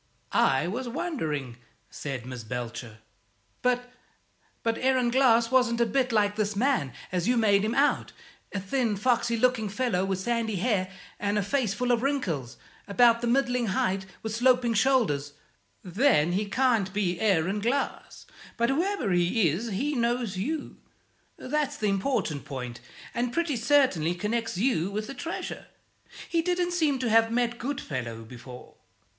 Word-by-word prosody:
"I 135 +3 +3
was 240 +6 -3
wondering," 155 - -3 0.3
said 135 -5 -5
Miss 125 -2 -7
Belcher. 120 -1 -6 0.6
"But 250 0 0 0.7
but 230 0 0
Aaron 255 -2 +2
Glass 235 -2 +4
wasn't 250 -2 +3
a 235 - +4
bit 255 +1 0
like 205 -2 +2
this 210 -1 0
man, 225 - +1 0.2
as 180 +1 -1
you 245 0 +3
make 205 -3 +4
him 220 +3 -1
out; 285 +2 +2 0.4
a 200 - -2
thin, 225 +2 0
foxy 235 +1 +1
looking 240 -3 +2
fellow, 210 -4 0
with 195 -1 -1
sandy 225 +2 -1
hair 190 -2 0 0.3
and 205 0 0
a 205 - +1
face 225 -2 0
full 245 +2 0
of 235 -1 +2
wrinkles, 175 - -2 0.3
about 230 +2 +4
the 240 - -1
middling 250 -1 +1
height, 190 0 0 0.2
with 220 -1 -3
sloping 245 0 +3
shoulders 210 - +2 0.3
" 100 0 -41
"Then 180 - +3
he 200 +4 0
can't 230 -5 +2
be 185 -4 0
Aaron 195 -1 +2
Glass. 245 +7 -2 0.3
But 235 0 +2
whoever 345 - 0
he 175 +2 +3
is, 200 +11 -3
he 260 +9 -1
knows 235 -4 0
you 280 +11 -3 0.6
that's 295 +1 -2
the 210 - 0
important 195 - -1
point 125 -3 -6 0.3
and 240 0 -1
pretty 335 0 0
certainly 230 - +2
connects 225 +2 -2
you 195 -5 +1
with 210 +2 -3
the 275 - -7
treasure. 330 +5 -5 0.6
He 335 - +1
didn't 355 +1 0
seem 315 -6 +1
to 250 -2 -1
have 225 0 +4
met 235 0 0
Goodfellow 130 - -4
before. 125 +2 -12
225 Hz, 155 wpm, -27 LUFS, 185-255 Hz, 0.7 s, Glass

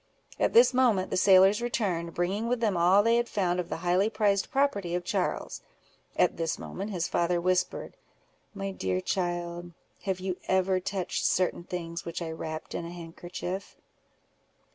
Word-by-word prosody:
At - - +2
this 465 - +7
moment 235 -7 +2
the - - 0
sailors 190 +2 +6
returned, 185 -9 -2
bringing 195 +6 -1
with 245 0 0
them 215 -4 +1
all 180 +4 +5
they 230 +1 +4
had 235 0 0
found 180 -3 0
of 175 -1 -3
the - - -3
highly 185 +4 +3
prized 205 -3 +1
property 265 - 0
of 180 - -2
Charles. - - -2 0.5
At - - +2
this 165 -1 -1
moment 200 +3 -6
his 180 -4 -2
father 175 0 +1
whispered—"My 185 +2 -4
dear 95 - -1
child, 175 - -3 0.3
have 190 -2 -1
you 185 -1 -3
ever 190 0 +2
touched 185 -1 -3
certain 180 -1 +1
things 170 -1 -5
which 170 - -5
I 165 -2 -4
wrapped 160 -1 -6
in - - -3
a 170 - -6
handkerchief?" 175 +2 -6
185 Hz, 165 wpm, -28 LUFS, 175-200 Hz, 0.5 s, this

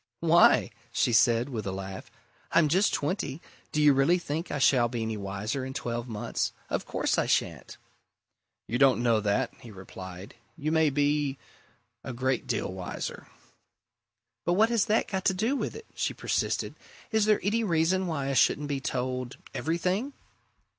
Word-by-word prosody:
"Why?" 170 +1 +5 0.2
she 120 - +1
said, 115 +2 +4
with 110 -6 -4
a - - -1
laugh. 95 +5 -7 0.4
"I'm 165 -2 +4
just 190 +7 +3
twenty 145 -2 -2 0.3
do 150 - -1
you 150 -1 +6
really 135 +7 +4
think 165 0 -4
I 145 - -2
shall 130 -3 +4
be 120 -1 -3
any 110 0 -2
wiser 105 +6 -3
in 130 +1 -6
twelve 120 -2 -3
months? 110 -3 -2 0.2
Of - - -2
course - - 0
I - - 0
shan't!" - - -1 0.9
"You 125 - -1
don't 135 -3 +4
know 115 -2 +3
that," 100 -1 0
he 120 - -12
replied. 95 -1 -10 0.2
"You 155 0 -2
may 160 -1 +4
be 145 0 +1 0.7
a 125 - -5
great 130 +1 -1
deal - - -2
wiser." - - -6 1.2
"But 175 - +1
what 220 +5 +4
has 230 -3 +2
that 215 +2 +1
got 190 -1 -3
to 190 - +3
do 225 +9 +1
with - - -3
it?" 450 0 -9
she - - -2
persisted. - - -1 0.4
"Is 220 -2 +3
there 215 -1 +4
any 225 +3 +1
reason 180 0 +1
why 140 -5 -2
I - - 0
shouldn't 145 +2 +2
be 140 -1 -1
told 130 -1 -3 0.2
everything?" 185 - -1
140 Hz, 170 wpm, -28 LUFS, 120-175 Hz, 1.2 s, you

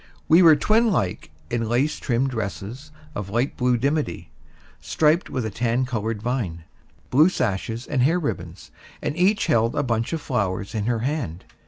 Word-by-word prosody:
We 165 +3 +6
were 165 -3 +8
twin 220 +9 +3
like 95 - -1 0.2
in 115 -2 -1
lace 130 +6 +1
trimmed 130 +1 0
dresses 110 +5 -5 0.2
of 100 -2 -5
light 120 +7 0
blue 125 -2 +2
dimity, 140 - -2 0.5
striped 160 +3 +1
with 125 -3 -2
a 110 - -3
tan 120 +4 0
colored 110 -3 -3
vine, 110 -10 -2 0.5
blue 150 +7 +6
sashes 115 - -2
and 135 -4 -1
hair 155 +8 +3
ribbons; 90 - -5 0.3
and 145 - -2
each 190 +4 +2
held 115 -8 +2
a 145 - +1
bunch 115 -3 -1
of 165 - -1
flowers 100 -8 -2
in 110 -1 -2
her 120 -2 0
hand. 125 - -3
120 Hz, 170 wpm, -23 LUFS, 110-150 Hz, 0.5 s, were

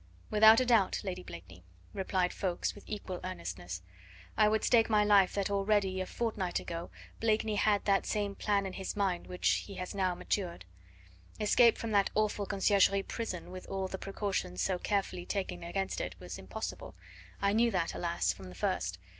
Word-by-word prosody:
"Without 220 +1 +8
a 255 - +2
doubt, 230 -6 +3
Lady 190 -3 -4
Blakeney," 85 0 -11 0.3
replied 185 -2 0
Ffoulkes 180 -3 -2
with 205 - -13
equal 200 -4 -5
earnestness. 90 - -6 0.5
"I 215 - +5
would 220 0 +1
stake 230 -2 +4
my 210 -1 +4
life 200 -3 +5
that 200 0 0
already 195 -1 +1
a 185 - -3
fortnight 210 -6 -2
ago 170 0 -6 0.3
Blakeney 220 -1 +1
had 205 -1 +2
that 195 -1 +2
same 205 -1 -1
plan 200 -1 0
in 190 - -5
his 190 0 -4
mind 195 -4 -1
which 180 - -2 0.2
he 200 - -8
has 185 0 -5
now 185 -3 0
matured. 175 - -3 0.7
Escape 230 +2 +5
from 230 - -4
that 200 -2 +3
awful 210 -1 0
Conciergerie 195 0 +3
prison 185 -7 -5
with 185 0 -8
all 190 -1 -2
the 190 0 -6
precautions 195 - -3
so 185 - 0
carefully 195 -3 -1
taken 190 -3 -3
against 190 +3 -2
it 90 - -4
was 90 0 -7
impossible. 95 -2 -6 0.4
I 200 0 +2
knew 235 +2 +4
that 180 -6 -1
alas! 170 - 0
from 95 0 -11
the 90 - -11
first. - - -1
195 Hz, 180 wpm, -32 LUFS, 180-210 Hz, 0.7 s, Without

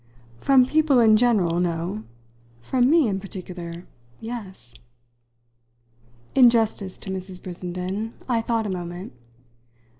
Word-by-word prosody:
"From 265 - +5
people 300 -1 +3
in 220 -2 +6
general, 210 -8 +2
no. 175 +4 -2 0.6
From 255 - +2
me 320 -4 +5
in 195 -2 -1
particular, 180 -3 -8 0.3
yes." 205 - -8 1.6
In 250 -3 +7
justice 220 -5 0
to 190 - -7
Mrs. 185 -1 -6
Brissenden 185 +4 -5
I 235 -3 +1
thought 225 -1 -1
a - - -2
moment. 175 -1 -6
200 Hz, 115 wpm, -24 LUFS, 180-235 Hz, 1.6 s, In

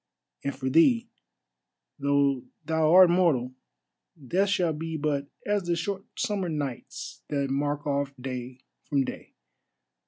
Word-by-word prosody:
And 140 - -2
for 130 0 -4
thee, 230 - +4 0.9
though 140 -2 +2 0.2
thou 160 0 +2
art 180 0 +8
mortal, 150 -9 +2 0.8
death 195 +3 +2
shall 175 -4 +2
be 160 +1 -4
but 145 -2 -1 0.2
as 205 -2 0
the 175 0 +1
short 195 +3 -3
summer 205 -7 -1
nights 145 -5 -5
that 140 -2 -1
mark 145 +1 -1
off 140 -1 0
day 125 0 -6 0.3
from 140 -2 +2
day. - - -8
150 Hz, 130 wpm, -27 LUFS, 140-175 Hz, 0.9 s, art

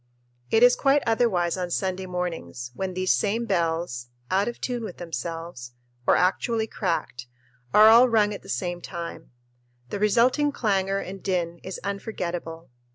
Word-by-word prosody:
It 225 +1 +4
is 245 0 +7
quite 275 +1 +3
otherwise 210 -7 +1
on 180 -1 -3
Sunday 185 +1 -2
mornings 165 - -4
when 185 +4 -4
these 185 0 +2
same 220 +3 0
bells, 165 - -1 0.2
"out 195 +2 +2
of 240 - -4
tune 245 -2 -3
with 200 -5 -7
themselves," 165 -6 -6 0.3
or - - +6
actually 220 +5 +1
cracked, 165 - -3 0.4
are 215 +1 +8
all 235 +3 +8
rung 210 -2 +3
at 200 - -7
the - - -14
same 175 -1 -2
time. 170 -1 -7 0.6
The - - -3
resulting 245 +8 +3
clangor 195 -6 0
and 195 -1 -6
din 170 -3 -2
is 190 - -6
unforgettable. 175 - -5
190 Hz, 155 wpm, -25 LUFS, 170-220 Hz, 0.6 s, are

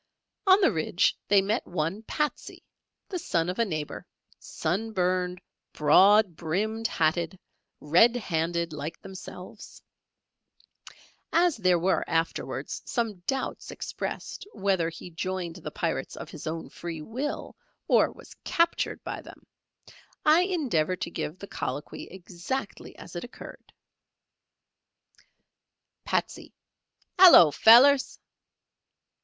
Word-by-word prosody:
On 380 +1 +7
the 375 - +4
ridge 170 +2 +1
they 200 -1 +4
met 215 +5 -1
one 175 +4 -2
"Patsey," 300 +6 -4 0.5
the 365 - -3
son 170 - -1
of 185 - -4
a 230 - +3
neighbour, 155 -6 -5 0.3
sun 210 +8 -3
burned, 180 -1 0 0.3
broad 190 +5 +5
brimmed 215 +8 -2
hatted, 165 0 0 0.4
red 180 +11 +4
handed, 170 -5 -2
like 155 +2 -6
themselves. 190 +1 -10 1.5
As 345 -2 +3
there 185 -4 +3
were 180 +3 +1
afterwards 165 0 -2
some 225 -6 -2
doubts 270 -1 -3
expressed - - -6
whether 190 - 0
he 170 +2 -10
joined 180 0 -4
the 175 - -7
Pirates - - -3
of - - -8
his - - -8
own 160 +1 -4
free 165 -3 -7
will, 260 - -5 0.3
or - - +4
was - - -14
captured 335 -1 0
by - - -5
them, - - -15 0.8
I 320 +4 +5
endeavour 240 - 0
to 180 -1 -5
give 155 +1 -4
the 200 - -9
colloquy 145 -6 -5
exactly 185 +7 -6
as - - -12
it - - -4
occurred: - - -12 2.3
Patsey. - - -3 0.6
"Hallo, 335 - +9
fellers." 260 - +6
185 Hz, 115 wpm, -27 LUFS, 165-225 Hz, 2.3 s, Hallo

